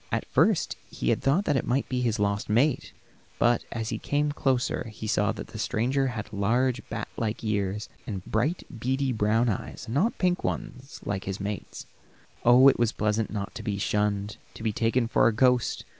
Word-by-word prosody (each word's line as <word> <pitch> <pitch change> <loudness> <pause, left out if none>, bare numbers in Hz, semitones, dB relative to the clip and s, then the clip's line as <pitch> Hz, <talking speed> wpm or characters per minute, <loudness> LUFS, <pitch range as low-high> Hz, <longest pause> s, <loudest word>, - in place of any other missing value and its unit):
At - - -1
first - - +2
he 60 - -2
had - - 0
thought 160 +10 +2
it 140 -5 +2
might 130 +3 0
be 125 -1 -1
his 115 -2 +1
lost 100 0 -1
mate, 125 +7 +2 0.5
but 120 0 +3
as 115 -1 -3
he - - -3
came 145 +1 0
closer 130 -4 0
he 110 - -8
saw 110 - +2
that - - -8
the - - -8
stranger 130 +5 +1
had 110 -3 -5
large, 120 +5 +1
bat 115 -2 -4
like 110 0 -2
ears, 105 -1 -1 0.2
and 95 -4 -5
bright, 125 +11 0 0.2
beady 130 +3 0
brown 110 +1 +2
eyes; 105 - -3
not 150 - +1
pink 180 -1 +1
ones, 135 -6 -5
like 95 -2 -3
his 95 0 -4
mate's. 100 +1 -5 0.6
Oh, 125 +3 +7
it 135 - +5
was 120 -2 +3
pleasant 105 0 0
not 105 0 -4
to 125 - -6
be 105 -3 -2
shunned, 105 0 -1 0.2
to - - -9
be 110 -2 0
taken 115 +2 +1
for 115 - +4
a - - +4
ghost. 125 +2 +2
115 Hz, 190 wpm, -27 LUFS, 105-130 Hz, 0.6 s, Oh